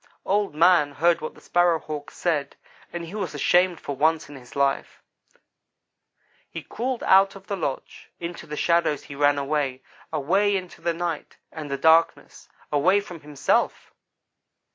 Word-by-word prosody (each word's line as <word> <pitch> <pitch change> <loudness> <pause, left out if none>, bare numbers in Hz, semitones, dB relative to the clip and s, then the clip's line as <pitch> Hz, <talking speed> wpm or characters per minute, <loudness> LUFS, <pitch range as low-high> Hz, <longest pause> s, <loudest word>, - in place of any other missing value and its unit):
"Old 200 -5 0
man 165 -3 +4
heard 170 +2 +2
what 155 - -6
the - - -17
Sparrow 175 -1 +2
hawk 150 -2 -7
said, 150 -5 -2 0.4
and 170 -1 -5
he 165 - -10
was 190 -8 -4
ashamed 175 +4 +3
for 140 - -5
once 155 +2 +1
in 145 - -10
his 125 -2 -14
life. 140 -1 -1 1.5
He - - -7
crawled 250 0 -4
out 195 +1 +5
of 195 -1 -12
the 200 - -3
lodge. 140 -8 -5
Into 170 0 -7
the 150 0 -6
shadows 170 -4 +1
he 140 - -10
ran 145 0 +3
away 140 -2 -2 0.3
away 195 +7 +2
into 185 -2 -9
the 170 -1 -1
night, 170 -2 -4
and 155 -2 -7
the 140 - -2
darkness 160 +3 +2 0.2
away 180 +8 +3
from 180 -4 -9
himself! 145 -2 -1
165 Hz, 160 wpm, -24 LUFS, 145-180 Hz, 1.5 s, out